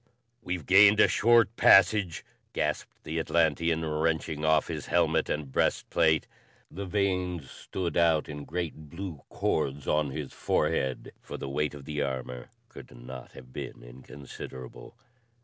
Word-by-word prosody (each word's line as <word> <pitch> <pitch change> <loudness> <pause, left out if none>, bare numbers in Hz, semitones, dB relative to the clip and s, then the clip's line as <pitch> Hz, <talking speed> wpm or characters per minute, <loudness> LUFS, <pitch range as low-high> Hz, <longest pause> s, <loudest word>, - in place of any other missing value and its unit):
"We've 90 -7 -4
gained 100 +2 +7
a - - +7
short 115 -1 +4
passage," 95 -2 +5 0.3
gasped - - -3
the 80 +2 -3
Atlantean 80 0 +1
wrenching 80 0 -1
off 80 -1 +3
his - - -5
helmet - - +2
and 75 -3 -3
breast - - 0
plate. 80 -1 +3 0.5
The 100 +3 -6
veins 90 -7 -1
stood 85 -4 -5
out 80 -2 +3
in 75 -1 -7
great 80 -2 -5
blue 85 -3 -7
cords 70 +1 -1
on 75 -1 +1
his 70 0 -6
forehead, 65 -1 -1
for - - -8
the 70 - -6
weight 75 +2 -1
of 70 -2 -11
the 75 -1 -3
armor 65 -3 -4 0.2
could - - -12
not 60 +1 -10
have 65 -1 -13
been - - -7
inconsiderable. 65 0 -10
80 Hz, 145 wpm, -28 LUFS, 70-90 Hz, 0.5 s, gained